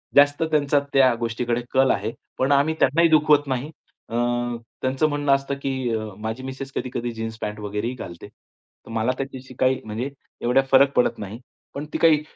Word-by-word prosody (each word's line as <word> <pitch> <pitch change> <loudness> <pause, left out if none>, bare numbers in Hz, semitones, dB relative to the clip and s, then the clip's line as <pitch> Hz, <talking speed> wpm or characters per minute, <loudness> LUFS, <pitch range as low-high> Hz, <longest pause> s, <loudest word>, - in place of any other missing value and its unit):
जास्त 145 +2 +5
त्यांचा 145 -1 +3
त्या 130 -2 +6
गोष्टीकडे 120 +1 -1
कल 130 0 +4
आहे. 105 +3 -1 0.3
पण 130 +2 +2
आम्ही 145 +3 +4
त्यांनाही 165 +5 +4
दुखवत 150 -2 +4
नाही. 130 +3 -2 0.4
अ, 115 - -4 0.7
त्यांचं 130 +4 +1
म्हणणं 145 -1 0
असतं 140 0 -3
की 135 - 0 0.5
माझी 110 +4 -4
मिसेस 135 +1 -6
कधी-कधी 120 -1 -3
जीन्स 110 0 -5
पॅन्ट 105 0 -4
वगैरेही 105 +3 -3
घालते. 85 -8 -9
तर - - -25
मला 115 +2 +1
त्याच्याशी 130 -1 -6
काही 130 0 +2
म्हणजे 110 +5 -3 0.3
एवढा 125 +3 +4
फरक 135 +1 +6
पडत 125 - +2
नाही. 105 +2 -7 0.3
पण 145 +2 -5
ती - - 0
काही 160 -3 +5
130 Hz, 170 wpm, -23 LUFS, 115-140 Hz, 0.7 s, त्या